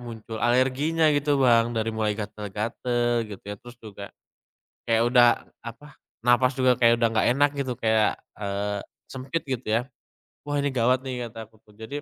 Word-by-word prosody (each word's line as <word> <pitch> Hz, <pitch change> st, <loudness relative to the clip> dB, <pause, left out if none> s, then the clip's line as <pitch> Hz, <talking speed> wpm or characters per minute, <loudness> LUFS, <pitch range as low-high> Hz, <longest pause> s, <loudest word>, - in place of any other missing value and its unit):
muncul 115 Hz, -2 st, -8 dB
alerginya 135 Hz, +6 st, +2 dB
gitu 145 Hz, 0 st, +1 dB
Bang. 115 Hz, -1 st, +3 dB
Dari 110 Hz, 0 st, 0 dB
mulai 110 Hz, -1 st, 0 dB
gatal-gatal 115 Hz, +3 st, -2 dB
gitu 100 Hz, -2 st, -10 dB
ya, 105 Hz, -, -4 dB
terus 120 Hz, 0 st, -13 dB
juga 100 Hz, -2 st, -9 dB, 0.8 s
kayak 115 Hz, 0 st, +3 dB
udah, 120 Hz, -1 st, +6 dB, 0.4 s
apa, 145 Hz, +5 st, -11 dB, 0.3 s
napas 125 Hz, +2 st, +4 dB
juga 130 Hz, -1 st, +4 dB
kayak 115 Hz, -1 st, +5 dB
udah 115 Hz, -, +4 dB
nggak 110 Hz, -, +2 dB
enak 145 Hz, 0 st, +4 dB
gitu 130 Hz, -2 st, -2 dB
kayak, 110 Hz, -1 st, +2 dB, 0.2 s
eee, 100 Hz, 0 st, -3 dB, 0.3 s
sempit, 135 Hz, +5 st, -4 dB
gitu, 130 Hz, -2 st, -4 dB
ya. 115 Hz, +2 st, +2 dB, 0.6 s
"Wah, 145 Hz, 0 st, -1 dB
ini 145 Hz, -, 0 dB
gawat, 125 Hz, +1 st, +2 dB
nih", 125 Hz, -2 st, -4 dB
kata 115 Hz, 0 st, -9 dB
aku 110 Hz, -, -25 dB
tuh. 105 Hz, -, -21 dB
Jadi, 140 Hz, +6 st, -6 dB
120 Hz, 170 wpm, -25 LUFS, 110-130 Hz, 0.8 s, udah